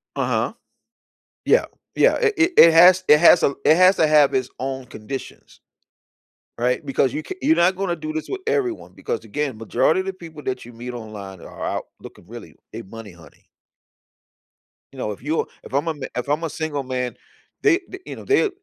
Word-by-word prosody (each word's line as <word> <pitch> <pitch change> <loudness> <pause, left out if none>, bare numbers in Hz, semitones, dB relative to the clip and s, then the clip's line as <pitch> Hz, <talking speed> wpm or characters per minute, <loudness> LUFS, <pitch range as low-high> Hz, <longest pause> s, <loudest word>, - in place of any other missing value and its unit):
Uh-huh. - - -1 0.9
Yeah, - - +4 0.3
yeah, - - +4
it 450 -2 +2
it 340 +2 +3
it 165 - +9
has 180 +3 +7
it 150 - +7
has 170 - +7
a - - +4
l 140 - -3
it 155 +2 +5
has 185 +1 +6
to 160 - +3
have 150 -2 +4
its 130 -1 0
own 130 0 -4
conditions. 125 +2 -9 1.0
Right? 125 +1 0
Because 135 -1 0
you 155 - -3
ca - - -7
you're 310 +4 +3
not 180 +2 +3
gonna 185 -2 -2
do 155 -1 -6
this 155 0 -5
with 390 -1 -5
everyone 415 -7 -2
because, 470 -1 -4
again, 145 -6 -3
majority 115 +10 +1
of 190 - -5
the 195 - -2
people 165 -4 -12
that 130 - -4
you 120 - -12
meet 120 +2 -8
online 105 -5 -9
are - - -9
out - - -3
looking - - -14
really - - -11 0.2
they - - -7
money 110 +2 -11
honey. 85 -2 -19 1.5
You - - -15
know, 105 - -2
if 100 - -9
you 155 +5 -1 0.2
if - - -13
I'm 145 +4 0
a - - +1
m 150 - -10 0.2
if 125 - -3
I'm 150 +3 -1
a 165 - -2
single 155 -3 -4
man, 125 -1 -3 0.5
they 390 -4 +4
th 380 0 -9
you - - -7
know, - - -11
they 410 +2 +3
150 Hz, 205 wpm, -22 LUFS, 125-185 Hz, 1.5 s, it